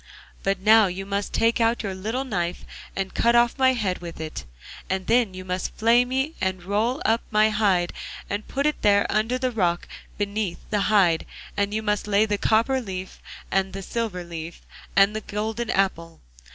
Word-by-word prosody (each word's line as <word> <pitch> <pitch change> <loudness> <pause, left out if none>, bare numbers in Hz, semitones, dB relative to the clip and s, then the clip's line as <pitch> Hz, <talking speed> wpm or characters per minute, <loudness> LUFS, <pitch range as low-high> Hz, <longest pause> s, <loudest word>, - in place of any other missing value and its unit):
But 195 -1 0
now 215 +1 +6
you 190 +2 -5
must 200 0 -2
take 230 +1 +2
out 230 0 +2
your 195 -2 -3
little 220 +8 -3
knife 180 -8 -3 0.3
and 195 -1 -3
cut 235 +1 +3
off 240 +2 +3
my 260 0 +5
head 205 -7 -1
with 170 -2 -8
it, 155 - -6 0.4
and 190 0 -1
then 230 -5 +2
you 185 0 -7
must 180 0 -3
flay 235 +2 +4
me 265 +5 -1
and 185 -1 -1
roll 215 +8 0
up 225 +1 +3
my 215 0 +4
hide 195 -5 +2 0.3
and 205 +1 -4
put 280 +1 -2
it 300 - 0
there 200 -1 +4
under 220 +4 +1
the 255 0 -1
rock, 175 -6 0
and - - -15
beneath 205 -2 -2
the 210 -1 +1
hide 185 -6 +3 0.3
you 205 +2 -1
must 210 -1 -1
lay 210 +1 +3
the 205 -2 -1
copper 235 +4 +2
leaf, 190 -4 -7 0.3
and 195 0 +1
the 195 0 -6
silver 215 -5 -3
leaf, 170 -1 -8 0.3
and 200 +2 +5
the 215 - -2
golden 220 +3 -3
apple. 170 -4 -1
205 Hz, 190 wpm, -24 LUFS, 190-225 Hz, 0.4 s, now